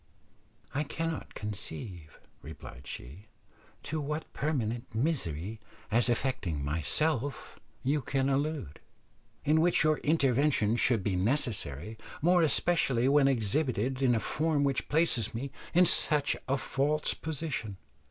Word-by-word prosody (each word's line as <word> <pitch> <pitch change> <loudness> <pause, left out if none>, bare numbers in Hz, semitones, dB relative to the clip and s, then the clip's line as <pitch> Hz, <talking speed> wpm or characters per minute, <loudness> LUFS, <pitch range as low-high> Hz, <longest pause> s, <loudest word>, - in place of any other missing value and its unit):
"I 145 - 0
cannot 165 +2 -4
conceive," 95 -5 -7 0.2
replied 70 -2 -11
she, 80 - -9 0.6
"to 155 +1 -3
what 150 +2 -4
permanent 120 -6 -2
misery, 110 - -2 0.3
as 120 +2 +4
affecting 100 - -1
myself, 125 - -1 0.2
you 145 +3 +1
can 135 +1 0
allude, 140 - -1 0.7
in 155 +2 +4
which 170 0 +4
your 155 -1 +2
intervention 140 -6 +2
should 120 -3 +2
be 95 -2 0
necessary, 105 - 0 0.2
more 175 +3 +4
especially 145 -6 +2
when 140 -1 +5
exhibited 130 +1 0
in 125 -3 +4
a - - +1
form 155 +3 0
which 140 -2 -1
places 150 -8 +2
me 135 +3 -4 0.2
in 180 +1 +5
such 150 -3 +3
a 135 +1 +1
false 145 +3 0
position. 145 - -4
135 Hz, 125 wpm, -30 LUFS, 105-150 Hz, 0.7 s, when